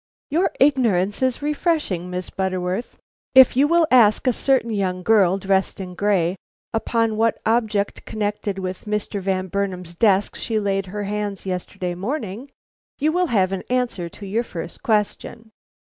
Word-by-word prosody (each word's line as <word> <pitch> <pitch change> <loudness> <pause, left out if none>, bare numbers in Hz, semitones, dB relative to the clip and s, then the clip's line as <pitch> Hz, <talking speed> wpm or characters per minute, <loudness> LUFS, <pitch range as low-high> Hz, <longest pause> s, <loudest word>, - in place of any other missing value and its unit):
"Your 340 +6 +2
ignorance 230 -9 +2
is 260 +1 0
refreshing, 295 - -1
Miss 180 -1 -5
Butterworth. 185 +3 -3 0.4
If 260 -2 +8
you 275 +3 +4
will 340 +1 +4
ask 225 -3 +5
a 255 - +3
certain 255 -2 +1
young 185 -3 -1
girl 195 -3 +4
dressed 195 0 0
in 185 -1 -6
gray, 185 -2 +1 0.4
upon 225 -1 0
what 225 +1 +1
object 220 -3 0
connected 205 -2 -3
with 185 +1 -5
Mr. 210 -1 -2
Van 190 -1 -1
Burnam's 185 -2 -3
desk 200 0 +2
she 225 - -2
laid 195 -2 -1
her 205 +3 -4
hands 205 -1 -3
yesterday 180 -1 -3
morning, 220 - -4 0.5
you 305 +2 +1
will 360 +2 +1
have 195 - +2
an 195 - -2
answer 245 -9 -1
to 200 - -11
your 210 +4 0
first 170 -7 -7
question. 220 -1 -1
205 Hz, 155 wpm, -22 LUFS, 190-235 Hz, 0.5 s, If